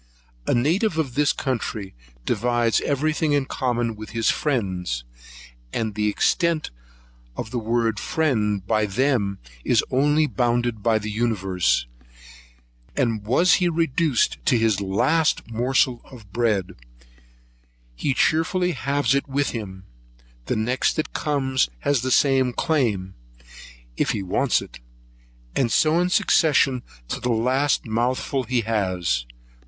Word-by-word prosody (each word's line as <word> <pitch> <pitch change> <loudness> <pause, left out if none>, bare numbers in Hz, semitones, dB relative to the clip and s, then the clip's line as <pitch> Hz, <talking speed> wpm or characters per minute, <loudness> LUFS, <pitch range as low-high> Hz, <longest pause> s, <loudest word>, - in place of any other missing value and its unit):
A - - +2
native 165 - +1
of 145 -6 -1
this 150 +4 +3
country 115 -9 -3 0.3
divides 120 +1 +1
every 150 +2 0
thing 155 -2 0
in 140 -2 +2
common 120 -4 -1
with 110 0 -9
his 115 - +3
friend, 100 -11 -2 0.8
and 110 -2 -2
the 105 0 0
extent 165 - +1 0.7
of 110 - -5
the 125 - -1
word 115 -1 0
friend, 105 -11 0
by 110 0 +1
them, 105 -3 0 0.3
is - - +3
only 145 +4 +3
bounded 120 -4 0
by 110 +1 +2
the 105 0 -4
universe, 95 - 0 1.1
and 115 -6 0
was 170 +10 +4
he 175 - +3
reduced 165 -4 +1
to 125 - +4
his 110 -3 +1
last 150 +12 +1
morsel 125 +1 +1
of 110 -7 -15
bread, 105 -6 0 1.2
he 130 - -1
cheerfully 180 +5 +2
halves 140 -2 0
it 140 0 -1
with 140 +1 0
him; 95 -5 -7 0.6
the - - 0
next 120 +4 0
that 155 - -3
comes 135 - 0
has 145 -4 +1
the 130 - -2
same 130 -1 +3
claim, 110 - 0 0.8
if - - +1
he 100 - -3
wants 90 - +1
it, - - -13 0.8
and 120 -4 +1
so 160 +1 +3
in 180 +1 +1
succession 150 - +3 0.3
to - - -3
the 125 - -2
last 130 +5 +1
mouthful 125 +4 -1
he 125 +1 0
has. 90 - -1
120 Hz, 135 wpm, -23 LUFS, 110-145 Hz, 1.2 s, was